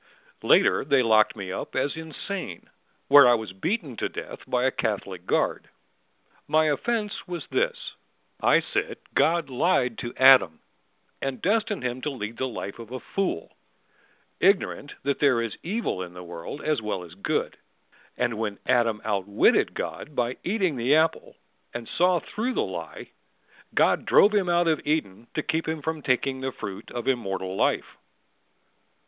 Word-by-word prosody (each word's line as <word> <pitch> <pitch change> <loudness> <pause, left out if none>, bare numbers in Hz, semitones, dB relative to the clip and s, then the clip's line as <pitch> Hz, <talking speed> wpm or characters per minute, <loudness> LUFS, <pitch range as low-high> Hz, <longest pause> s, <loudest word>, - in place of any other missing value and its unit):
Later - - +4
they 140 -2 +3
locked 110 -2 +4
me 95 -3 -6
up 95 - -6
as 135 +3 0
insane 160 - -7 0.4
Where 140 -3 +8
I 120 - +6
was 110 -5 -5
beaten 155 - -2
to - - -1
death - - -7
by 125 -1 +1
a 130 - +3
Catholic 100 -6 -3
guard. - - 0 0.8
My 155 +1 +3
offense 210 +7 -2
was 175 -1 -5
this: - - 0 0.6
I - - +5
said - - -2 0.2
God 170 +1 +2
lied 125 -4 +1
to 120 - -6
Adam, 130 -12 +6 0.6
and 135 -1 -3
destined 210 - 0
him 125 0 -3
To 150 - -2
lead 115 -5 -6
the 130 - -1
life 105 -3 -6
of 115 0 -10
a 130 - -4
fool, 190 - -3 0.8
Ignorant 185 -6 +1
that 140 0 0
there 135 -5 +4
is 115 -2 -3
evil 195 - -2
in 90 -1 -7
the 90 - -8
world 85 - -8
as 155 -5 0
well 105 -4 -3
as 85 -2 -12
good. 100 - -2 0.6
And 115 -3 -1
when 105 -3 -2
Adam 115 -3 +2
outwitted 100 -1 +2
God 150 - -5
by 120 0 -1
eating 185 -7 0
the 125 +5 +3
apple 160 +1 +1 0.4
And 120 -1 -5
saw 180 0 +2
through 240 +8 -3
the - - +2
lie, - - -7 0.7
God - - +3
drove 205 +2 +6
him 195 -4 +2
out 175 0 +3
of 160 -2 +2
Eden 120 -8 -2
to 155 - -1
keep 165 -2 -1
him 160 -2 -3
from 160 0 -3
taking 130 0 0
The 130 0 -2
fruit 100 -6 -7
of 120 -1 -5
immortal 95 -7 -1
life. - - 0
130 Hz, 165 wpm, -26 LUFS, 110-160 Hz, 0.8 s, Where